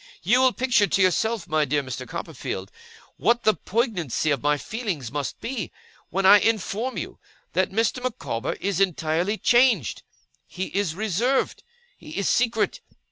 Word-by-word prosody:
'You 235 +8 +4
will 260 -1 +5
picture 240 -5 +2
to 195 - +1
yourself, 210 +3 +1
my 155 0 +2
dear 145 +1 0
Mr. 130 -3 -6
Copperfield, 95 +1 -5 0.5
what 235 +1 +2
the 215 - +5
poignancy 185 - -1
of 140 -4 0
my 150 0 +2
feelings 185 - -4
must 145 -1 -4
be, 230 -8 -4 0.4
when 195 +3 -1
I 205 +2 +9
inform 225 +3 -1
you - - -6 0.3
that 185 - +2
Mr. 225 +4 0
Micawber 235 - -3
is 195 -2 -2
entirely 175 +2 +1
changed. 240 - +3 0.5
He 190 +1 -6
is 195 -6 0
reserved. 220 +6 0 0.4
He 305 0 -9
is 200 - 0
secret. 230 -3 +1
200 Hz, 150 wpm, -24 LUFS, 160-235 Hz, 0.5 s, I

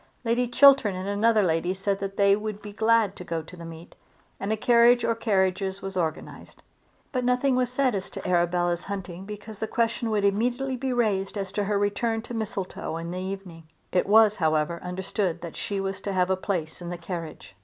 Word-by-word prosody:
Lady 240 +2 +1
Chiltern 260 -5 +6
and 185 +1 -5
another 215 +2 +3
lady 175 +1 0
said 195 +1 -1
that 195 0 -5
they 200 0 +5
would 210 0 -5
be 210 -1 -9
glad 220 -2 +2
to - - -8
go 165 -2 -3
to 170 - -12
the 170 - -10
meet, 165 0 -10 0.5
and 200 +2 -2
a 220 - +1
carriage 240 +2 +5
or 230 - +2
carriages 195 -3 0
were 195 - -4
organised. 160 -4 -4 0.5
But 255 -2 -1
nothing 250 +2 +2
was 250 -1 +1
said 255 -1 +1
as 195 -2 -3
to - - -7
Arabella's 175 0 +1
hunting 190 -2 -6
because 210 0 -9
the 220 - -2
question 230 0 0
would 210 -2 +1
immediately 245 +6 0
be 260 +1 -2
raised 210 -5 0
as 195 -2 -4
to 205 0 -1
her 205 0 +1
return 220 +3 0
to 240 - -8
Mistletoe 205 -7 -4
in 165 +1 -5
the 180 - -4
evening. 185 -3 -7 0.3
It 180 - +1
was, 215 0 +6
however, 155 0 0
understood 180 -1 -2
that 170 -2 -7
she 200 -1 -3
was 195 0 -3
to 200 - -3
have 185 0 +2
a - - +3
place 180 -4 -3
in 175 - -6
the 175 - -4
carriage. 170 - -7
200 Hz, 210 wpm, -26 LUFS, 180-225 Hz, 0.5 s, Chiltern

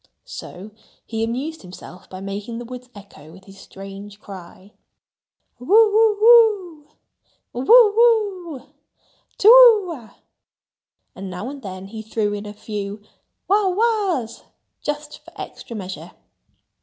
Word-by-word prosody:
So 195 +4 -10 0.3
he 225 -1 -4
amused 265 +8 -4
himself 180 0 -13
by 185 0 -9
making 200 +4 -6
the 240 - -7
woods 250 +1 -10
echo 195 -6 -15
with 190 +3 -16
his 195 0 -16
strange 195 +1 -11
cry, 195 0 -13 0.9
"Whoo 245 - -12
whoo 425 -5 +4 0.7
whoo, 245 - -4
whoo - - -5 0.9
whoo, 255 - -16 0.7
to 400 - +1
whoo 455 -6 +8
ah!" 235 -8 -14 1.0
And 195 0 -8
now 185 +8 -6
and 280 -1 -10
then 190 -3 -8
he 220 +1 -8
threw 215 -1 -2
in 205 0 -6
a - - -7
few 205 -1 -7 0.4
"wha 400 0 +2
whas," 375 - -1 0.4
just 295 0 -5
for - - -17
extra 235 - -9
measure. 190 -3 -8
230 Hz, 130 wpm, -21 LUFS, -, 1.0 s, whoo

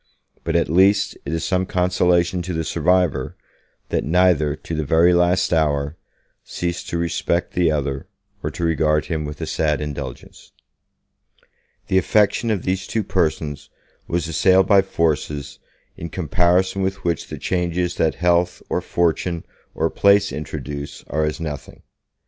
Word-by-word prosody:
But, - - -2
at - - +3
least, 95 +5 +3
it - - -4
is 80 0 -2
some 95 -1 0
consolation 90 -1 +2
to 90 +1 -4
the 80 - -1
survivor, 90 +2 +1 0.5
that - - 0
neither, 80 -3 +3
to 85 - -8
the 80 -1 -1
very 80 +5 +4
last 90 +1 +2
hour, 75 -2 +1 0.5
ceased 85 0 -4
to 85 - -2
respect 85 +1 -1
the 90 -2 +2
other, 70 -3 -2 0.3
or - - -2
to - - -6
regard 75 -2 +2
him 80 -3 -3
with 75 +1 -7
a - - -1
sad 75 -2 0
indulgence. 70 -4 -7 1.3
The 95 - +3
affection 105 +4 +2
of 105 -5 0
these 95 +1 -2
two 110 - -1
persons 80 -6 -1 0.4
was 85 0 -1
assailed 95 +3 +4
by 100 0 +5
forces 75 -5 -2 0.4
in 85 - -6
comparison 90 +3 +1
with 95 +1 -2
which 85 -3 -1
the - - -7
changes 90 -1 -1
that 80 - +1
health 90 0 +1
or - - 0
fortune 85 0 -1 0.3
or - - 0
place 100 0 +4
introduce 75 -1 -6
are 75 +1 0
as 75 - -3
nothing. 75 -4 -7
85 Hz, 150 wpm, -21 LUFS, 75-90 Hz, 1.3 s, by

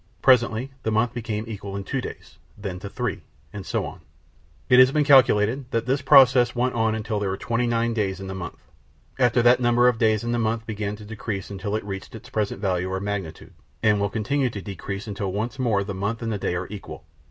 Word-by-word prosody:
Presently 125 0 +3
the - - -2
month 110 +2 +1
became 110 -2 -3
equal 100 -3 -6
to 100 - -4
two 135 +5 -2
days, - - -9 0.2
then 100 -3 -5
to 100 - -7
three, - - -3 0.3
and 100 - -6
so - - -2
on. - - -9 0.7
It 125 - +6
has 130 +1 +7
been 150 +1 +2
calculated 130 -2 +4
that 115 -3 -1
this 135 +2 0
process 130 -3 +6
went 125 +1 +1
on 115 -1 +1
until 110 -1 -2
there 100 -2 -1
were 95 - -2
twenty 120 +3 -1
nine 115 0 +1
days 100 -4 -1
in 95 - -7
the 95 - -5
month. 90 -4 -7 0.6
After 120 -1 +3
that 120 +1 +6
the - - -10
number 120 +1 +4
of 120 -2 +2
days 110 -1 +2
in 120 - -2
the 120 - 0
month 115 0 -1
began 105 -2 -3
to 105 0 -12
decrease 105 -3 -5
until 100 +1 -3
it 110 - -3
reached 95 +2 -7
its 125 +3 -12
present 105 -4 -1
value 95 -2 -1
or 95 - -1
magnitude, 95 -5 -5 0.3
and 105 -2 +4
will 100 - +1
continue 125 +6 0
to 105 - -6
decrease 100 0 -6
until 100 -2 -3
once 110 +7 -3
more 110 -6 +1
the 100 0 -5
month 100 +5 -3
and 115 - -2
the 105 - -3
day 90 - -1
are 90 +1 -2
equal. 105 -2 -9
110 Hz, 230 wpm, -24 LUFS, 100-120 Hz, 0.7 s, has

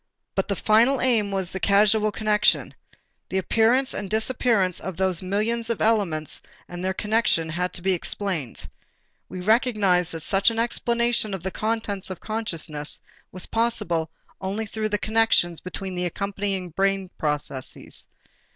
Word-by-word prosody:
But 195 - 0
the 200 - -1
final 230 +7 +4
aim 225 -5 +2
was 190 -2 -2
the 190 - -3
causal 210 +2 +4
connection. 215 0 +2 0.6
The 190 - -1
appearance 235 +7 +2
and 200 - -4
disappearance 220 -4 +1
of 190 -3 -6
those 190 -2 +2
millions 220 +5 -1
of 230 - -1
elements 195 -9 0 0.3
and 175 0 -7
their 190 0 -1
connection 210 -7 +1
had 180 +3 -1
to 175 - -8
be 190 0 +3
explained. 175 - -4 0.6
We 185 - -6
recognized 200 -5 +2
that 165 - -4
such 195 +6 +3
an 230 - -4
explanation 235 -2 +1
of 180 - -8
the 190 - -2
contents 215 -3 -2
of 185 - -6
consciousness 165 -9 -3 0.3
was 185 - -1
possible 175 -8 0 0.3
only 200 +4 -2
through 215 +1 -3
the 210 - +1
connections 215 -6 +2
between 190 +1 -5
the 180 0 -1
accompanying 195 0 -3
brain 195 +2 0
processes. 145 -3 -3
200 Hz, 150 wpm, -24 LUFS, 180-220 Hz, 0.6 s, final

